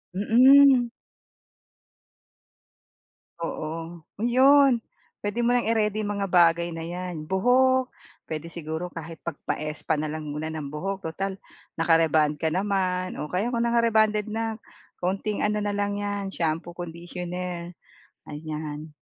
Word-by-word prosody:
Mm. 255 +4 +6 2.5
Oo, 165 0 -5 0.2
yun. 260 +2 +5 0.4
Pwede 210 +4 -1
mo 245 - +3
nang 245 -1 +2
i-ready 215 -1 +1
mga 200 -1 -1
bagay 170 -1 +4
na 165 - -6
yan, 175 -1 -5
buhok. 255 +6 +3 0.4
Pwede 160 +1 -5
siguro 165 +1 -5
kahit 165 -1 -9
pagpa-spa 155 -2 -3
na 155 0 -2
lang 155 0 -5
muna 150 +2 -4
ng 155 -3 -5
buhok 195 +5 -4
tutal 195 +3 -4 0.4
naka-rebond 160 -2 +3
ka 160 - +2
naman 185 -1 0
o 150 - -5
kaya 200 +7 0
kung 235 - +1
naka-rebonded 220 -3 +3
na 225 0 -2 0.4
kaunting 195 +3 -1
ano 210 0 0
na 205 - -1
lang 205 0 -1
yan 205 -1 -3
shampoo, 165 +1 -2
conditioner, 175 +1 -6 0.6
ayan. 150 0 -6
180 Hz, 120 wpm, -26 LUFS, 165-215 Hz, 2.5 s, Mm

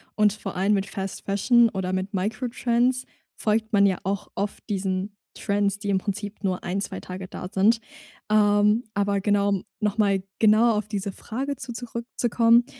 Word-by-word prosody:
und 210 -1 +4
vor 210 -2 -7
allem 195 +3 +2
mit 195 -1 +1
Fast 195 -1 -6
Fashion 230 +4 +4
oder 190 -2 -3
mit 190 +2 -2
Microtrends 240 +5 0 0.3
folgt 220 +1 0
man 200 0 +6
ja 190 -2 +2
auch 195 +1 -2
oft 205 +1 -3
diesen 195 0 -2 0.2
Trends, 200 0 0
die 205 - -4
im 195 - +3
Prinzip 205 +2 -4
nur 185 -2 -1
1, 190 +2 -2
2 190 -1 -4
Tage 185 0 -7
da 180 - -7
sind. 220 +4 +3 0.5
Ähm, 210 +2 +4
aber 200 0 +1
genau, 205 0 +2
um 200 -2 0 0.2
noch 210 +1 0
mal 200 -3 +3 0.2
genauer 220 +1 +5
auf 210 -1 -2
diese 200 -2 -3
Frage 270 +8 -4
zu 245 -1 -7
zurückzukommen, 235 0 +2
205 Hz, 175 wpm, -25 LUFS, 195-225 Hz, 0.5 s, man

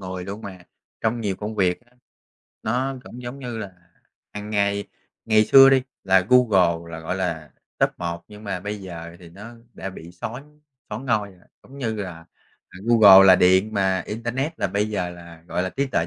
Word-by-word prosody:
người 90 -1 -6
luôn 100 +2 -7
mà. 95 -2 -8 0.4
Trong 115 +1 -1
nhiều 100 -4 -2
công 105 +2 -5
việc 90 -3 +1
á, 120 0 -30 0.7
nó 130 +5 -1
cũng 125 - -10
giống 120 +3 -7
như 120 -4 -6
là 100 -3 -7 0.6
hằng 105 0 -7
ngày 100 -1 0 0.4
ngày 110 -1 +4
xưa 135 +4 +8
đi, 135 -1 +4 0.2
là 95 0 +5
Google 90 -9 +3
là, 80 - -6
gọi 80 +3 -3
là, 85 -5 -3 0.3
top - - +3
1 85 0 -4
nhưng 105 +1 -13
mà 95 -3 -3
bây 105 +2 -5
giờ 85 -3 -9
thì 85 -1 -14
nó 105 +7 -11 0.2
đã 95 - -6
bị 85 -1 -11
són 140 +11 -9 0.3
soán 120 +6 -6
ngôi 105 -4 0
rồi. 90 -2 -22 0.2
Giống 140 +2 -14
như 115 -4 -2
là 90 -6 -7 0.5
là 90 - -13
Google 100 -5 +8
là 95 - +8
điện 95 +4 +3
mà 95 -2 +1
internet 120 +8 -3
là - - +2
bây 100 +3 -1
giờ 90 -4 -2
là, 85 -2 -13
gọi 90 - -1
là, 95 - -2
trí 140 +1 -1
tuệ 85 -10 -1
100 Hz, 200 wpm, -23 LUFS, 90-115 Hz, 0.7 s, xưa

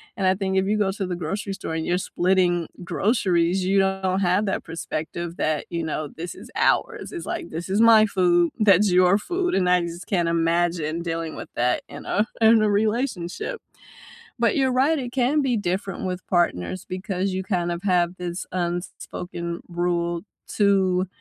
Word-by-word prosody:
and 195 -4 0
I 190 - +4
think 190 -1 -1
if 190 - 0
you 210 +1 +1
go 195 -2 +1
to 195 -2 -4
the 180 - -2
grocery 195 +4 -3
store 160 - -5
and 160 0 -2
you're 180 - +2
splitting 180 -2 +1 0.2
groceries, 185 -3 +1
you 195 +1 +3
don't 190 0 +1
have 185 +3 +2
that 190 - -2
perspective 165 +1 -5
that, 155 -1 0
you 170 -1 -2
know, 155 -1 -3
this 170 +2 -6
is - - -12
ours, - - +1
it's 345 - -6
like, 345 0 -4
"This 170 +2 -5
is 200 +4 +1
my 225 -1 +7
food, 175 -4 +2
that's 200 -2 +5
your 180 +2 +5
food," 355 - -1
and 185 -2 +2
I 180 -1 +4
just 170 +1 -6
can't 175 -4 0
imagine 165 -1 0
dealing 165 -1 -3
with - - -8
that 125 +1 +1
in - - -9
a 210 +3 +1
in 220 0 +6
a 215 - +3
relationship. 215 - -1 0.8
But 235 - +3
you're 265 -2 +2
right, 280 +5 +3
it 245 -2 -5
can 270 +4 +2
be 255 -4 +1
different 195 0 -2
with 180 0 -4
partners 175 - 0
because 185 0 -3
you 190 0 -3
kind 175 -2 -1
of 170 +2 -5
have 180 -1 +2
this 175 0 -4
un 175 -1 -1
s 175 - -8
spoken 170 -1 -6
rule 175 -1 -1 0.3
to, 190 -3 +2
185 Hz, 190 wpm, -24 LUFS, 170-205 Hz, 0.8 s, my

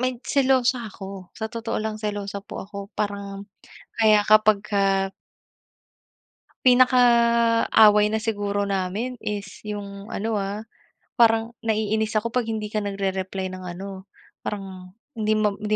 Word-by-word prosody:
may 255 -1 0
selosa 255 -4 +2
ako. 195 -2 -9
Sa 220 +1 -5
otoo 230 0 -3
lang 215 0 -3
selosa 205 -1 -4
po 195 - -8
ako 200 0 -8
parang 200 -1 -3 0.5
kaya 215 -2 +4
kapagka 200 -2 +3 1.5
pinaka 250 0 +6 0.7
away 210 -1 +6
na 220 - 0
siguro 205 -2 -1
namin 195 +6 -2
is 205 -2 -5
yung 200 -1 -7
ano, 220 +2 -2
ah, 205 +2 -3 0.5
parang 225 0 +4
naiinis 220 0 -1
ako 225 +2 0
'pag 245 -2 0
hindi 215 -2 -3
ka 215 - 0
nagre-reply 195 -2 -3
ng 185 0 -8
ano, 195 0 -8 0.3
parang 190 -2 -7 0.2
hindi 215 -3 0
ma 215 -1 +2
hindi 215 0 0
210 Hz, 130 wpm, -24 LUFS, 200-220 Hz, 1.5 s, pinaka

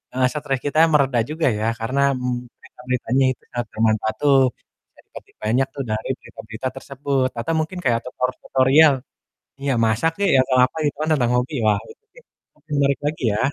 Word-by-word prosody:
heeh, 130 0 +3
stres 145 -3 -2
kita 145 +1 -2 0.2
mereda 135 -4 +3
juga 155 0 0
ya, 110 - -1
karena, 130 +5 -1
mmm, 125 -1 -3
berita-beritanya 125 +1 -1
itu - - -30
sangat 120 0 -3
bermanfaat 110 -1 +1
tuh. 140 -2 +5 0.5
Bisa - - -29
dipetik - - -14
banyak 125 +5 +1
tuh 140 - -3
dari 110 +3 -3
berita-berita 110 +4 -7
tersebut 135 -1 -1
atau 120 +8 -2
mungkin 160 +4 -3
kayak 115 -2 +2
tutor 125 0 -1
tutorial 140 +3 +5 0.7
iya 140 -1 0
masak 115 +9 +1
kek, 200 -1 +1
ya - - +5
atau 130 -1 +1
apa 130 - -9
gitu 145 - 0
kan 155 - -2
tentang 125 -5 +1
hobi. 125 +4 -1
Wah, 105 -1 +4
itu - - -20
sih - - -16 0.4
lebih 150 +1 -22
menarik 140 -1 +2
lagi 150 -1 -2
ya. - - -1
130 Hz, 185 wpm, -21 LUFS, 120-145 Hz, 0.7 s, tuh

